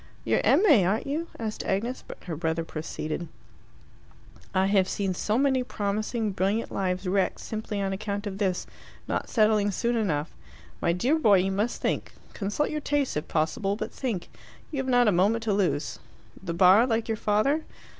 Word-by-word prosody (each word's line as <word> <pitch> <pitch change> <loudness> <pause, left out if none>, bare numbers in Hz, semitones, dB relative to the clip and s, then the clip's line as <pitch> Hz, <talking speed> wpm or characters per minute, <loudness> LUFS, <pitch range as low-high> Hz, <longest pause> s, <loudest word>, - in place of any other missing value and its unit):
"You're - - +2
M.A., 300 - +5
aren't 195 +5 0
you?" 310 +4 -2
asked 220 -2 -4
Agnes; 230 +7 -2
but - - -10
her 170 -3 -4
brother 160 +1 -1
proceeded 155 +1 -4 1.2
"I 190 -1 +2
have 195 -1 +3
seen 195 -2 -1
so 210 +4 0
many 265 -1 +3
promising, 215 0 -2
brilliant 195 +4 0
lives 185 0 -1
wrecked 190 +1 +1
simply 215 -2 -4
on 195 -1 -1
account 200 +1 -3
of 200 -1 -5
this 190 -3 0 0.4
not - - -2
settling 215 -2 +3
soon 235 +4 0
enough. 165 -9 0 0.5
My - - +2
dear 250 - +1
boy, 210 -9 +6
you 190 +1 +1
must 210 +5 -1
think. - - -1 0.2
Consult 205 +8 -1
your 305 0 -2
tastes 290 -2 0
if 150 - -3
possible 195 +6 0
but - - -5
think. 230 -10 -3 0.4
You 295 - -4
have 265 - -2
not 245 -2 +4
a - - +5
moment 205 +6 +2
to 220 -2 +1
lose. 185 -6 0 0.4
The 170 -3 -4
Bar, 190 +6 +6
like 225 -2 0
your 225 - 0
father?" 215 +10 +2
205 Hz, 175 wpm, -27 LUFS, 185-230 Hz, 1.2 s, boy